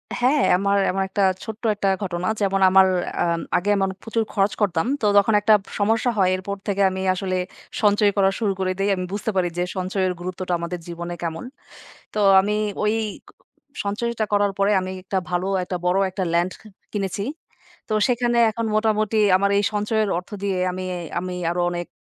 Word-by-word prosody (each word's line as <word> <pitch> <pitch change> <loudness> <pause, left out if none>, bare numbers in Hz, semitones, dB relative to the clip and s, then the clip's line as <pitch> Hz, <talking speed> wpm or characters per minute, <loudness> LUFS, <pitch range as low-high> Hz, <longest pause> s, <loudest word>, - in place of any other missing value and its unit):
হ্যাঁ, 260 +4 +2
আমার 200 +1 +1
এমন 195 +1 -1
একটা 200 +1 0 0.2
ছোট্ট 220 +1 -8
একটা 200 -1 0
ঘটনা 180 -1 -3
যেমন 195 -1 +1
আমার 190 0 +6 0.4
আম 170 -1 0 0.2
আগে 185 +4 -1
এমন 195 -1 +1
প্রচুর 225 0 -1
খরচ 200 0 +2
করতাম। 170 -5 +1 0.2
তো - - 0
তখন 205 +2 +4
একটা 215 +1 +5 0.3
সমস্যা 225 +4 +2
হয় 190 -2 +4
এরপর 190 +2 -4
থেকে 200 -1 0
আমি 190 0 -4
আসলে 185 0 -2 0.4
সঞ্চয় 205 -1 +4
করা 195 -1 +4
শুরু 210 -4 +1
করে 185 -1 0
দেই 195 +1 +1
আমি 185 -1 -3
বুঝতে 210 +2 -2
পারি 185 -2 +2
যে 175 - +1
সঞ্চয়ের 185 0 -1
গুরুত্বটা 180 0 -4
আমাদের 170 +1 -4
জীবনে 170 0 -5
কেমন। 165 +3 -4 0.7
তো 215 - 0 0.2
আমি 205 +2 -1 0.3
ওই 210 +1 +2 0.9
সঞ্চয়টা 225 +2 -1
করার 205 -1 +2
পরে 200 +1 +3
আমি 185 0 -5
একটা 190 +1 -2
ভালো 180 +1 -1 0.2
একটা 180 - -4
বড় 180 +2 +3
একটা 185 0 -3
ল্যান্ড 175 +2 +1
ক - - -19 0.3
কিনেছি। 200 -1 -2 0.7
তো - - 0
সেখানে 240 -1 +1
এখন 230 +1 -3
মোটামুটি 215 0 +1 0.2
আমার 200 +1 +1
এই 205 - +2
সঞ্চয়ের 210 0 0
অর্থ 180 - -7
দিয়ে 195 -2 0
আমি 185 +1 -5 0.4
আমি 180 0 -5 0.2
আরো 175 +1 -1
অনেক 175 0 -4
195 Hz, 180 wpm, -22 LUFS, 185-210 Hz, 0.9 s, আমার